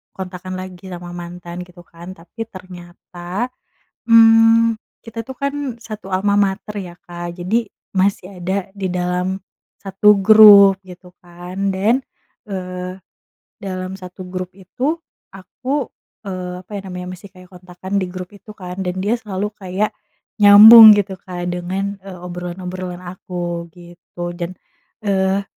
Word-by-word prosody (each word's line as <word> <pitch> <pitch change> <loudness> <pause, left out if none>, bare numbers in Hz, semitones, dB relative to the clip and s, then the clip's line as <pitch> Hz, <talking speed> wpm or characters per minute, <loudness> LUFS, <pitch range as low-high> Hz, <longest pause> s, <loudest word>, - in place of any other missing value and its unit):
kontakan 185 0 -7
lagi 185 0 -9
sama 175 0 -8
mantan 175 0 -8
gitu 180 0 -16
kan. 170 +1 -11
Tapi 225 +7 -9
ternyata, 180 +2 -7 0.6
mmm, 225 0 +6 0.3
kita 230 0 -7
tuh 265 - -7
kan 280 +2 -2 0.3
satu 215 -3 -8
almamater 200 +1 0
ya, 180 -3 -7
Kak, 175 0 -7
jadi 225 +6 0 0.3
masih 190 0 0
ada 190 +2 -3
di 195 -1 -3
dalam 180 +1 -2 0.4
satu 200 +2 +4
grup 200 -1 +8
gitu 180 0 -13
kan. 180 +3 -5
Dan, 215 +7 +2 0.5
eee, 185 -1 -6 0.6
dalam 185 -1 -5
satu 185 0 -10
grup 185 0 -5
itu 255 - -3 0.3
aku, 250 +9 -4 0.4
eee, 180 -2 -5
apa - - -22
ya - - -5
namanya 180 0 -6
masih 190 +2 -12
kayak 185 -1 -16
kontakan 180 +2 -5
di 185 - -3
grup 185 0 -7
itu 205 +1 -13
kan, 180 -1 -7
dan 180 -1 -3
dia 205 +4 0
selalu 210 -2 -4
kayak 195 +1 -3 0.5
nyambung 215 +2 +11
gitu 200 -1 -1
kan 180 -1 -6
dengan, 190 +3 -3
eee, 195 -2 -9
obrolan-obrolan 180 0 -6
aku 175 -1 -5
gitu. 175 0 -9
Dan, 175 +1 -6 0.5
eee, 195 0 +1
185 Hz, 135 wpm, -19 LUFS, 180-200 Hz, 0.6 s, nyambung